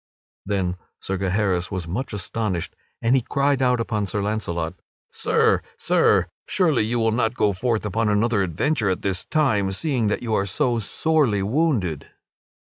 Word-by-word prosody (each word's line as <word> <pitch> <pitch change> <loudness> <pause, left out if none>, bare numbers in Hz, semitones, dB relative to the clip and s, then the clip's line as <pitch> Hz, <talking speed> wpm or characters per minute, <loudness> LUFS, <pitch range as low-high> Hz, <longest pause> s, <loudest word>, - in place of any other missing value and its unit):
Then 95 -3 -1 0.2
Sir 95 -1 -3
Gaheris 95 -2 0
was 95 -4 -4
very 85 - -6
much 130 +7 -3
astonished, 105 -2 -3 0.3
and 115 +3 +4
he 130 - +3
cried 140 +2 +1
out 125 -1 +3
upon 105 -3 -1
Sir 105 - -2
Launcelot: 85 -6 -2 0.4
"Sir! - - +2 0.2
Sir! - - +3 0.2
Surely 160 - +2
you 115 +3 -1
will 115 -1 +2
not 115 +1 0
go 105 -5 +2
forth 110 +2 -1
upon 105 +2 0
another 105 +1 +2
adventure 105 - 0
at 95 - -2
this 95 -2 -2
time, 110 -11 +1
seeing 125 +1 0
that 105 - -1
you 115 -2 -2
are 100 -1 +1
so 120 +5 0
sorely 125 -3 +1
wounded." 110 - 0
110 Hz, 165 wpm, -23 LUFS, 95-125 Hz, 0.4 s, and